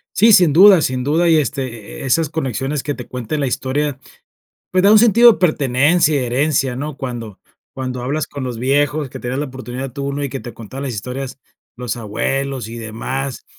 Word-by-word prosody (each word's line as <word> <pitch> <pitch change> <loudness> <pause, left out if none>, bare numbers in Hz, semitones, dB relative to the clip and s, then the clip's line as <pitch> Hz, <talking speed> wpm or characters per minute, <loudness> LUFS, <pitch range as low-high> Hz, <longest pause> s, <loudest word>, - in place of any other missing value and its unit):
Sí, 220 +2 +6
sin 175 -5 +6
duda, 185 +3 +7
sin 130 -3 -1
duda, 160 +5 +2
y, 160 - +5
este, 130 -7 -4
eh, - - -5
esas 155 +4 +1
conexiones 135 -1 -2
que 145 - -3
te 125 - -8
cuente 125 +4 -4
la 140 - 0
historia, 135 +2 -2 0.7
pues, 185 0 +2
da 200 - +6
un 215 - +8
sentido 235 +1 +7
de - - -9
pertenencia 150 0 +2
y 135 -3 0
herencia, 135 +1 0
¿no? 145 +2 -5
Cuando 120 -7 -6 0.3
cuando 130 -2 -5
hablas 145 +4 -2
con 140 -2 -7
los 125 -2 -4
viejos, 145 +3 0
que - - -9
te 120 - -5
das 130 +2 -2
la 150 - -1
oportunidad 130 -1 -7
tú, 140 +1 -3
¿no?, 145 - -4
y - - -1
que 135 - -5
te 120 - -8
contaran 125 +5 -8
las 135 -3 -3
historias, 125 +5 -6 0.4
los 125 -2 -3
abuelos 125 +3 -3
y 115 +1 -8
demás, 125 +4 -5
135 Hz, 210 wpm, -18 LUFS, 125-150 Hz, 0.7 s, un